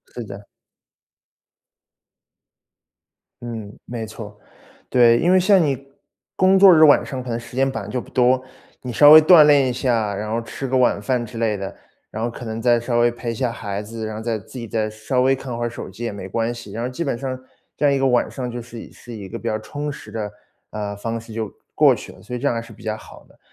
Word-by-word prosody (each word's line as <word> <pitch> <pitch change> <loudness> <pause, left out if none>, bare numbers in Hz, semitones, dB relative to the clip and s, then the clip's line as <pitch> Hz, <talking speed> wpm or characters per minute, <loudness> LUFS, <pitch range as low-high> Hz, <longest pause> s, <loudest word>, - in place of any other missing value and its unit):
是 120 - -5
的。 100 -1 -10 3.0
嗯， 110 -3 -7
没 115 -2 -5
错。 105 -1 -10 0.5
对， 120 -2 +5
因 175 - +2
为 185 - +6
像 195 +1 +5
你， 135 -2 -2 0.5
工 190 +1 +4
作 195 -1 +9
日 160 - +6
晚 145 -2 +6
上 130 -3 -5
可 125 - -8
能 115 0 -2
时 120 - -12
间 135 +1 +2
本 125 - -4
来 100 - -8
就 125 - -2
不 - - -10
多， 130 0 +3 0.4
你 125 -1 -5
稍 145 +6 +7
微 155 - +12
锻 155 0 +8
炼 145 -3 +5
一 125 - -1
下， 115 -5 0
然 105 +2 -4
后 115 - 0
吃 135 +4 -6
个 130 +1 +1
晚 125 -5 +2
饭 125 +1 -1
之 115 0 -8
类 110 -3 0
的， 100 0 -6 0.4
然 110 - -4
后 120 - 0
可 120 +1 -9
能 110 0 -5
再 120 0 +3
稍 120 0 -1
微 120 0 +4
陪 120 0 -5
一 - - -4
下 120 +1 -1
孩 105 -3 -5
子， 110 +1 -7
然 110 0 -5
后 110 - -6
再 115 -1 -2
自 115 +5 -10
己 115 - -6
再 110 0 -1
稍 110 +4 -1
微 135 +1 +3
看 130 -3 -6
会 120 - -2
儿 - - -1
手 120 - -8
机 120 - -9
也 115 - -2
没 100 -2 -7
关 115 +4 -1
系。 115 -4 -10
然 115 +3 -4
后 125 - -2
基 130 +7 -4
本 135 -6 -2
上 130 0 -4 0.4
这 - - -5
样 145 - +5
一 - - +1
个 135 - +1
晚 125 -2 +2
上 125 -2 -5
就 120 0 -5
是 115 0 -10
是 120 - -13
一 105 -4 -8
个 115 +4 -7
比 - - -14
较 110 - 0
充 145 +7 -5
实 - - -11
的， 105 -2 -4 0.4
呃， 105 -1 -4
方 115 +3 -4
式 115 0 -12
就 110 -2 -4 0.2
过 - - +5
去 - - -10
了， - - -17
所 125 - -7
以 - - -4
这 135 - -5
样 - - +2
还 115 - -2
是 115 0 -13
比 110 - -15
较 110 -1 -2
好 - - -14
的。 - - -25
120 Hz, 275 characters per minute, -21 LUFS, 110-130 Hz, 3.0 s, 微